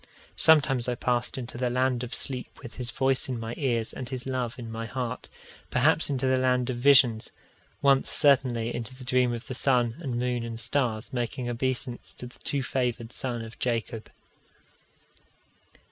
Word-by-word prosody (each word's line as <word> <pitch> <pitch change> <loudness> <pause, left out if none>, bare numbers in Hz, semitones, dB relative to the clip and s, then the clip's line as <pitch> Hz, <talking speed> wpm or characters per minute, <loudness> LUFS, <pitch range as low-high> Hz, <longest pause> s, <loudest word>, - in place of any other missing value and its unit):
Sometimes 135 -6 +5
I 125 - 0
passed 120 +1 -1
into 120 -1 -6
the 125 -1 +1
land 125 0 +1
of 125 - -6
sleep 130 -3 -3
with 120 - -8
his 125 -1 -1
voice 130 +3 +1
in 125 -2 -2
my 115 +1 -5
ears 120 -5 -1
and 125 -2 -6
his 130 -2 -4
love 130 -2 -3
in 115 -3 -7
my 115 0 -5
heart; 125 0 -4 0.4
perhaps 150 +5 +3
into 135 -2 -1
the 130 0 +3
land 125 -1 +1
of 120 - -4
visions 125 -4 +5 0.5
once 135 -1 +4
certainly 125 -5 +3
into 120 +2 -5
a - - -8
dream 125 0 +2
of 120 +1 -5
the - - -6
sun 125 -3 +1
and 130 -8 -3
moon 125 -1 -1
and 115 -1 -6
stars 120 -4 -1
making 120 0 -3
obeisance 120 0 -3
to - - -8
the 125 - -13
too 140 -2 -1
favoured 125 -2 -2
son 120 -4 -3
of 115 0 -11
Jacob. 115 -2 -2
125 Hz, 175 wpm, -27 LUFS, 120-130 Hz, 0.5 s, Sometimes